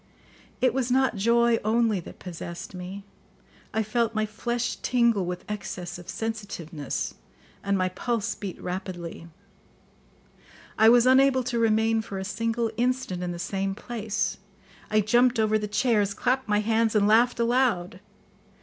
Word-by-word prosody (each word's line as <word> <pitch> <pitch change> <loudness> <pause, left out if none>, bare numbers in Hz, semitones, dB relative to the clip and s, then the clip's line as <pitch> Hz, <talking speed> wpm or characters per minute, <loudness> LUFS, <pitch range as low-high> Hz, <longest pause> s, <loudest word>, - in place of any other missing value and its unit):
It 255 -2 +3
was 260 -1 -1
not 260 -1 +2
joy 235 +3 +3
only 220 -1 +2
that 170 - -11
possessed 170 0 -8
me; 185 +2 -7 0.7
I 220 - 0
felt 225 +1 0
my 215 0 +1
flesh 235 +3 -2
tingle 235 -7 +2
with 180 0 -5
excess 180 -4 -5
of 175 - -12
sensitiveness, 200 -9 -4 0.5
and 200 0 +1
my 185 -1 +1
pulse 225 +4 -2
beat 195 -3 -7
rapidly. 180 -2 -6 1.5
I 220 +1 +6
was 240 0 +6
unable 260 0 +5
to 240 -1 -1
remain 225 0 +2
for 205 -3 -7
a 190 - -3
single 225 +3 -1
instant 245 -7 -1
in 180 -1 -2
the 175 - -5
same 195 +2 -2
place; 220 -2 -3 0.5
I 215 0 +3
jumped 240 +4 +3
over 215 0 +3
the 210 - -3
chairs, 210 -2 +1
clapped 260 +1 0
my 210 0 +2
hands, 225 0 +1
and 205 -1 +4
laughed 235 +3 +4
aloud. 235 -7 +1
215 Hz, 150 wpm, -26 LUFS, 195-235 Hz, 1.5 s, I